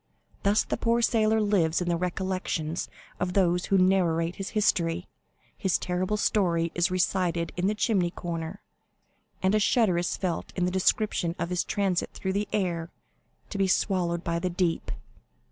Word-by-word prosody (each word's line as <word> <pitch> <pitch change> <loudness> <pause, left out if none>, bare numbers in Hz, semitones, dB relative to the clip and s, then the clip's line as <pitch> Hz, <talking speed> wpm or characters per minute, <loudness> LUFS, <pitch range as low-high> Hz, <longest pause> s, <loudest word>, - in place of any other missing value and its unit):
Thus 205 +2 +3
the - - -3
poor 235 0 +1
sailor 220 -1 +3
lives 195 -6 +2
in 180 - -3
the 175 - +2
recollection 180 -2 -2 0.4
of 180 0 -1
those 180 -2 +2
who 195 - +2
narrate 180 -3 +2
his 195 - -4
history; 175 -4 +1 0.5
his 190 -4 +1
terrible 185 +3 -1
story 170 -6 +1
is 175 0 +1
recited 180 -2 0
in 180 +1 0
the 210 - +1
chimney 200 -5 +1
corner, 170 +1 -5 0.8
and 190 +2 +3
a 215 - +4
shudder 205 -4 +3
is 175 - -1
felt 180 -4 -3
at 180 - +2
the 180 - 0
description 190 -2 +1
of 170 - -3
his 180 - +1
transit 195 -4 0
through 190 0 -2
the 205 +1 -1
air 170 -5 -1 0.6
to 200 - -4
be 195 - +3
swallowed 180 -3 +1
by 170 -1 -1
the 180 +1 -1
deep." 175 -1 -1
180 Hz, 165 wpm, -27 LUFS, 170-200 Hz, 0.8 s, a